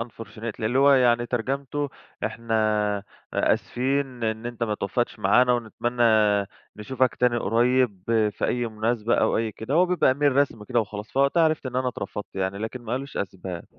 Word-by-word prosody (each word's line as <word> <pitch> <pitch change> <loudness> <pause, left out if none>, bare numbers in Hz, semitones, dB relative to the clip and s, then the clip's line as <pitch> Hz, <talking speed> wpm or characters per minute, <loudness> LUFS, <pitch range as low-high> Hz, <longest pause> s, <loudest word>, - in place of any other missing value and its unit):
unfortunately 115 -1 -8
اللي 115 +4 +1
هو 140 +1 +6
يعني 120 -2 +3
ترجمته 135 +4 -2 0.4
"إحنا 115 +1 -3 0.8
آسفين 130 -1 0
إن 110 +1 -2
أنت 120 -1 -6
ما 110 -2 0
توفقتش 120 +4 -2
معانا، 125 0 +4
ونتمنى 120 +1 -2 0.7
نشوفك 125 +4 0
تاني 125 -1 +3
قريب 120 -2 +1 0.3
في - - -4
أي 120 -1 0
مناسبة." 115 +1 0
أو - - +2
أي 110 -1 -1
كده، 110 +7 -4
هو 180 +3 +5
بيبقى 175 -7 +3
Email 145 - -8
رسمي 140 -6 +2
كده 120 +1 +1
وخلاص. 105 0 -6
فوقتها 140 +5 +3
عرفت 155 -3 +1
إن 125 -1 -4
أنا 130 0 +1
اترفضت 105 -3 -6
يعني. 95 +1 -2
لكن 110 +4 -5
ما 115 0 -5
قالوش 135 +2 -4
أسباب. 95 -3 -5
120 Hz, 165 wpm, -25 LUFS, 110-130 Hz, 0.8 s, هو